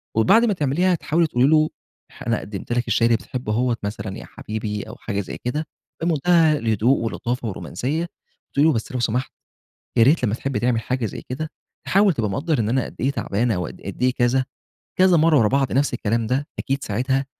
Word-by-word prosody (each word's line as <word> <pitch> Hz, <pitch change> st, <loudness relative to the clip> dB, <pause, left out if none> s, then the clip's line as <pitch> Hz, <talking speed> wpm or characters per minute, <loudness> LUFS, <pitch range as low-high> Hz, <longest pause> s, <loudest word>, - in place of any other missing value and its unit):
وبعد 170 Hz, -, +5 dB
ما 210 Hz, -, +2 dB
تعمليها 175 Hz, +4 st, +1 dB
تحاولي 165 Hz, +1 st, +1 dB
تقول 125 Hz, -4 st, +1 dB
لي 140 Hz, -, +5 dB
له 155 Hz, 0 st, +4 dB, 0.6 s
أنا 115 Hz, -, +2 dB
ح -, -, -5 dB
قدمت 105 Hz, +2 st, -7 dB
لك 120 Hz, 0 st, 0 dB
الشاى 115 Hz, +1 st, +2 dB
اللي 115 Hz, -1 st, +3 dB
بتحبه 120 Hz, -2 st, -4 dB
أهوّة 120 Hz, 0 st, +1 dB
مثلًا 100 Hz, -1 st, -4 dB
يا -, -, -9 dB
حبيبي 105 Hz, -1 st, -5 dB
أو -, -, -10 dB
حاجة 100 Hz, -2 st, -3 dB
زي 95 Hz, -, -7 dB
كده، 150 Hz, +6 st, -1 dB, 0.4 s
بمنتهى 165 Hz, -1 st, +3 dB
الهدوء 115 Hz, +3 st, +2 dB
واللطافه 120 Hz, +1 st, -3 dB
والرومانسيّة، 125 Hz, -, -3 dB, 0.4 s
بتقولي 145 Hz, +3 st, +4 dB
له 160 Hz, -, +4 dB
بس 115 Hz, +2 st, -3 dB
لو 125 Hz, -, -2 dB
سمحت 120 Hz, +3 st, -1 dB, 0.7 s
يا 115 Hz, -, +7 dB
ريت 140 Hz, +2 st, +4 dB
لمّا 105 Hz, -, 0 dB
تحبّ 135 Hz, +1 st, -3 dB
تعمل 120 Hz, -1 st, +1 dB
حاجة 125 Hz, -1 st, -2 dB
زي -, -, -5 dB
كده 155 Hz, +5 st, -4 dB, 0.4 s
تحاول 200 Hz, -1 st, +4 dB
تبقى 110 Hz, -7 st, -1 dB
مقدر 145 Hz, -, -1 dB
إن 110 Hz, 0 st, 0 dB
أنا 130 Hz, +1 st, +1 dB
قد -, -, -10 dB
إيه 135 Hz, +3 st, +1 dB
تعبانة 115 Hz, -4 st, 0 dB
أو 90 Hz, -, -2 dB
قد -, -, -8 dB
إيه 130 Hz, -, +3 dB
كذا، 130 Hz, +1 st, +2 dB, 0.5 s
كذا 185 Hz, -2 st, +6 dB
مرّة 160 Hz, -1 st, +5 dB
ورا 110 Hz, -3 st, +4 dB
بعض 135 Hz, +1 st, +1 dB
نفس 140 Hz, -1 st, +1 dB
الكلام 115 Hz, 0 st, 0 dB
ده، 135 Hz, +5 st, 0 dB
أكيد 135 Hz, +1 st, -2 dB
ساعتها 130 Hz, +6 st, 0 dB
125 Hz, 205 wpm, -22 LUFS, 115-150 Hz, 0.7 s, يا